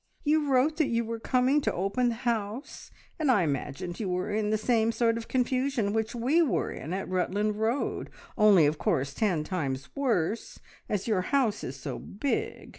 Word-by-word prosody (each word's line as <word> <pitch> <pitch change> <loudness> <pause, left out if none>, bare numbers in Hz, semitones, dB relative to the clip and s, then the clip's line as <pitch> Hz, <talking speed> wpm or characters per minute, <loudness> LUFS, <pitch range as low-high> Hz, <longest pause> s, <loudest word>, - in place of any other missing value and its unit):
You 300 -1 +2
wrote 275 +5 +3
that 310 -4 +2
you 235 0 0
were 230 0 -4
coming 255 +5 +2
to - - 0
open 200 +7 0
the 235 - -2
house, 230 +1 -3 0.3
and 305 -3 +1
I 205 -8 +4
imagined 160 +4 -3
you 180 -4 -1
in 210 0 -1
the 215 - +2
same 225 0 +2
sort 230 -1 +2
of 230 0 -5
confusion 255 -4 0
which 220 +1 -1
we 265 +9 +3
were 305 -8 +1
in 155 - -7
at 190 +1 -3
Rutland 205 +3 0
Road, 230 +5 -1 0.3
only 205 -7 +6
of 150 +1 0
course 140 +1 0
ten 180 -7 0
times 140 -7 -4
worse, 225 -6 -1 0.3
as 205 0 -1
your 210 -5 +2
house 250 +1 +1
is 130 - -5
so 130 - -6
big. 290 - -3
220 Hz, 185 wpm, -28 LUFS, 185-255 Hz, 0.3 s, only